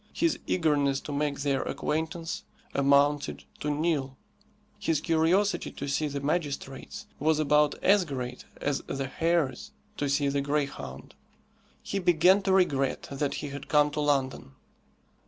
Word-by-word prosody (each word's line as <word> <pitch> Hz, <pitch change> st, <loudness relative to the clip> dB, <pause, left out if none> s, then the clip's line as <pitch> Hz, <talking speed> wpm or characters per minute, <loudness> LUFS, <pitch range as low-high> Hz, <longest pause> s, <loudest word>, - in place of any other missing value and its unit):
His 335 Hz, -1 st, +1 dB
eagerness 145 Hz, -5 st, +2 dB
to -, -, -7 dB
make 145 Hz, 0 st, -1 dB
their 140 Hz, -2 st, +1 dB
acquaintance 160 Hz, +2 st, -3 dB, 0.3 s
amounted 140 Hz, +1 st, +2 dB, 0.2 s
to 150 Hz, -, -2 dB
nil. 145 Hz, -3 st, -1 dB, 0.6 s
His 165 Hz, -7 st, +1 dB
curiosity 170 Hz, +6 st, +2 dB
to 140 Hz, -, -5 dB
see 150 Hz, +2 st, 0 dB
the 140 Hz, -1 st, -3 dB
magistrates 145 Hz, +3 st, -3 dB
was 155 Hz, +1 st, +2 dB
about 150 Hz, -1 st, +3 dB
as 200 Hz, 0 st, +5 dB
great 125 Hz, -5 st, -5 dB, 0.2 s
as 145 Hz, -1 st, -1 dB
the 135 Hz, 0 st, -2 dB
hare's 165 Hz, 0 st, 0 dB, 0.3 s
to 145 Hz, -, -1 dB
see 140 Hz, +1 st, +2 dB
the 140 Hz, 0 st, +1 dB
greyhound. 140 Hz, -, -3 dB, 0.7 s
He 200 Hz, -, -2 dB
began 180 Hz, +2 st, +5 dB
to 195 Hz, 0 st, 0 dB
regret 145 Hz, -8 st, +1 dB
that 140 Hz, 0 st, -1 dB
he -, -, -4 dB
had 140 Hz, 0 st, -7 dB
come 150 Hz, -1 st, +4 dB
to 150 Hz, -, -3 dB
London. 135 Hz, -, 0 dB
145 Hz, 140 wpm, -28 LUFS, 140-165 Hz, 0.7 s, as